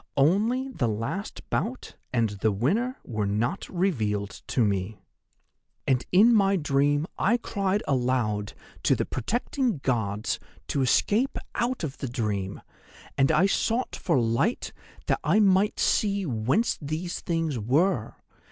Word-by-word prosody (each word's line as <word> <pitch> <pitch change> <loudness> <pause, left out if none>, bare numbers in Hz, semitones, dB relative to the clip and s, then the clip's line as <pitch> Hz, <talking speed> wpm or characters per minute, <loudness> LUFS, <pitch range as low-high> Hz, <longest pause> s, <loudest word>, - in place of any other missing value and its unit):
Only 215 - +3
the 195 - -1
last 115 - -4
bout 250 +3 -2 0.2
and 115 -3 +2
the 105 +2 0
winner 205 - 0
were 110 -4 -2
not 115 - -1
revealed 110 - -1
to 120 - +2
me. 100 +1 -2 0.9
"'And 130 -2 +2
in 215 +6 +6
my 200 -2 +4
dream 145 -2 +2
I 225 +5 +3
cried 200 -3 -1
aloud 120 -6 0 0.3
to - - +3
the - - -1
protecting 240 - -1
Gods 110 -4 -1 0.3
to 140 - 0
escape 210 - +2 0.2
out 240 -3 -1
of 140 -4 -4
the 135 - -3
dream, 100 -5 -3 0.5
and 135 +2 +3
I 160 +4 +4
sought 230 +5 0
for 135 - +1
light 115 0 0 0.3
that - - +1
I 175 +8 +3
might 200 0 +3
see 200 -2 +1
whence 130 - 0
these 155 +4 -3
things 165 -6 -1
were. 130 - +1
145 Hz, 135 wpm, -26 LUFS, -, 0.9 s, in